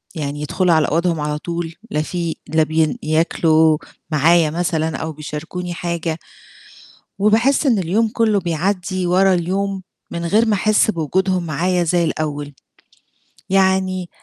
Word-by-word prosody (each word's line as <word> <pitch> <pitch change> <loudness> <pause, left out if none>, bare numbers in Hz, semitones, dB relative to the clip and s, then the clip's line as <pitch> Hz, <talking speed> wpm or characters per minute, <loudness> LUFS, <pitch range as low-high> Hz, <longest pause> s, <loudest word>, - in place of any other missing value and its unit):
يعني 145 -1 -4
يدخلوا 175 +3 +1
على 155 -1 +3
أوضهم 170 0 0
على 150 0 -2
طول، 170 0 -4 0.2
لا 150 - 0
في 170 0 -3
لا 160 0 +3
بي 155 0 0
ياكلوا 160 0 +3 0.3
معايا 160 +2 +4
مثلًا 160 -3 -1
أو 160 0 -4
بيشاركوني 160 +4 -6
حاجة، 170 -2 -3 1.0
وباحِسّ 225 +8 +3
إن 230 -7 +3
اليوم 200 +6 +1
كُلّه 220 -3 +1
بيعدي 185 +2 -1
ورا 190 +2 +4
اليوم، 190 +2 -1 0.3
من 170 0 -4
غير 215 +6 +3
ما 220 - +2
أحِسّ 215 +2 +3
بوجودهم 185 +2 0
معايا 175 +3 0
زي 170 +1 +1
الأول، 145 -2 -3 1.0
يعني 190 -1 +1
170 Hz, 135 wpm, -19 LUFS, 155-190 Hz, 1.0 s, معايا